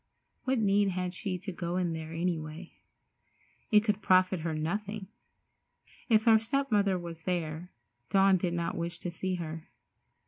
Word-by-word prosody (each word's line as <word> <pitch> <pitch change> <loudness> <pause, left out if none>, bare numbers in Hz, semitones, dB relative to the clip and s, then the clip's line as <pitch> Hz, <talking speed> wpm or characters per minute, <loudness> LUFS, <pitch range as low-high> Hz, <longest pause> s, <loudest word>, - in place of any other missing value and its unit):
What 265 0 +2
need 205 -2 +3
had 180 -1 -2
she 190 -1 -3
to 190 +2 -6
go 175 0 -3
in 175 -2 0
there, 160 0 -6
any 170 0 0
way? 155 +3 -9 1.0
It 210 -1 +6
could 210 -1 0
profit 185 -1 +4
her 160 0 -2
nothing. 200 +6 -3 1.0
If 220 -2 +5
her 225 -1 +6
step 275 +4 -1
mother 200 -3 +3
was 170 -2 -7
there, 170 -1 -3 0.4
Dawn 195 -1 +5
did 175 -1 -1
not 170 -1 -2
wish 170 0 -3
to 175 0 -5
see 185 +2 -2
her. 160 -2 -6
180 Hz, 165 wpm, -30 LUFS, 170-200 Hz, 1.0 s, It